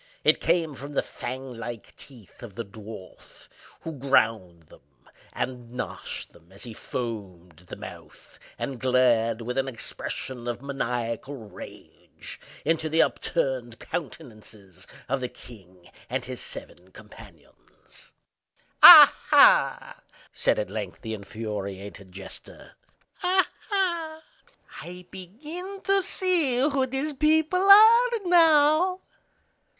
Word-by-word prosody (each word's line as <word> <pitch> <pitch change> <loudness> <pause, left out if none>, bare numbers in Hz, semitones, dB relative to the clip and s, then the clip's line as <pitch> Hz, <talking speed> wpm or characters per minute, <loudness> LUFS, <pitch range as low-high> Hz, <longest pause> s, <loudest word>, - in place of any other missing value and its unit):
It - - +4
came 165 -4 +1
from 140 +2 -9
the - - 0
fang 130 +1 -7
like 115 -1 -8
teeth 120 -8 -15
of 110 -5 -11
the 115 - -5
dwarf, 105 -1 -13 0.3
who 165 - -6
ground 110 -10 +1
them 75 - -19 0.5
and 125 -2 -5
gnashed 125 - -6
them 85 +3 -22
as 100 +4 -11
he 120 -3 -8
foamed 95 -9 -7
at 90 - -24
the - - -8
mouth, - - -13 0.2
and 130 -3 -5
glared, 120 -2 +2
with 125 +3 -3
an 135 - -1
expression 125 0 -5
of 120 -1 -3
maniacal 125 -1 -4
rage, 105 -7 -12 0.3
into 160 0 0
the 160 +1 +4
upturned 130 -8 -2
countenances 110 - -8 0.2
of 135 +2 -1
the 125 -1 -4
king 95 -9 -16 0.2
and - - -3
his - - -7
seven 90 +1 -8
companions. 105 -7 -16 0.7
"Ah, - - +11
ha!" - - +4 0.3
said - - +1
at 105 -2 -3
length 105 -3 -6
the 110 - -5
infuriated 100 -2 -7
jester. 95 +1 -12 0.5
"Ah, 375 0 +2 0.2
ha! 340 -5 -2 0.6
I 180 +1 -10
begin 305 - -9
to 390 0 +2
see 360 -8 +1
who 270 0 +1
these 270 +4 -3
people 315 +5 +2
are 450 +5 +8 0.2
now!" 330 +1 +4
125 Hz, 120 wpm, -25 LUFS, -, 0.7 s, Ah